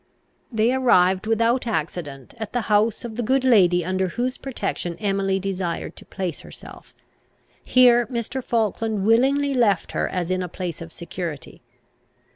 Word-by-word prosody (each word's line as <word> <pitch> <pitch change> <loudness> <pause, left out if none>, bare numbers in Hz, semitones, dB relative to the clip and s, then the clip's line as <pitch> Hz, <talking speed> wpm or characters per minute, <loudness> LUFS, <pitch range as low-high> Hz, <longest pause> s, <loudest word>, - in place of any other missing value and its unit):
They 225 +2 +2
arrived 190 -7 +3
without 230 +3 +1
accident 155 - -4
at 220 -2 -6
the 245 - 0
house 215 +2 +1
of 225 -1 -7
the - - 0
good 260 +3 +1
lady 180 -9 +4
under 185 +1 0
whose 245 +8 -3
protection 205 -9 -4
Emily 195 -2 0
desired 185 -3 -3
to - - -12
place 180 -5 -4
herself. - - -13 0.7
Here 240 -2 +5
Mr. 250 +1 -4
Falkland 220 -3 -1
willingly 275 +5 +3
left 215 -9 +2
her - - -1
as 180 -1 -3
in 185 0 0
a 180 - -4
place 175 -2 -5
of 165 0 -8
security. 170 -4 -7
210 Hz, 150 wpm, -23 LUFS, 180-240 Hz, 0.7 s, Here